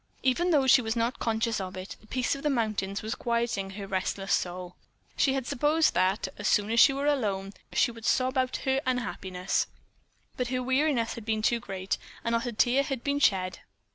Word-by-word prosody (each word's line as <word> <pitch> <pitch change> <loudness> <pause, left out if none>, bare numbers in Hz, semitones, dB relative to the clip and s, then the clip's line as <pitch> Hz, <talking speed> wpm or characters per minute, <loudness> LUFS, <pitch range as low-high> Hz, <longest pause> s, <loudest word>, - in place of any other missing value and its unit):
Even 305 +8 +2
though 290 -5 +4
she 260 0 +6
was 225 -1 -2
not 235 +2 -1
conscious 225 -1 0
of 185 0 -6
it, 185 +1 -7
the 215 - -20
peace 255 +2 0
of 275 - -5
the 300 - +1
mountains 215 -6 -1
was 220 - -2
quieting 235 -5 -1
her 200 0 -6
restless 195 0 -2
soul. 180 0 -2 0.4
She 270 -1 +2
had 265 -2 -2
supposed 300 +6 +2
that, 190 +2 +1
as 205 - -1
soon 210 +1 +2
as 230 - +3
she 275 - +8
were 275 +1 -2
alone, 205 -9 0 0.2
she 240 - +3
would 230 -1 -11
sob 255 +1 +2
out 255 -1 +1
her 265 0 +2
unhappiness, 190 -7 -1 0.7
but 250 - -1
her 255 0 -1
weariness 260 -2 +1
had 230 - -8
been 220 -1 -1
too 235 +1 +2
great, 190 -2 -3 0.2
and 230 - -1
not 230 +1 0
a - - -2
tear 245 +4 +3
had 270 -3 -4
been 285 0 0
shed. 185 -7 +2
230 Hz, 205 wpm, -28 LUFS, 195-260 Hz, 0.7 s, she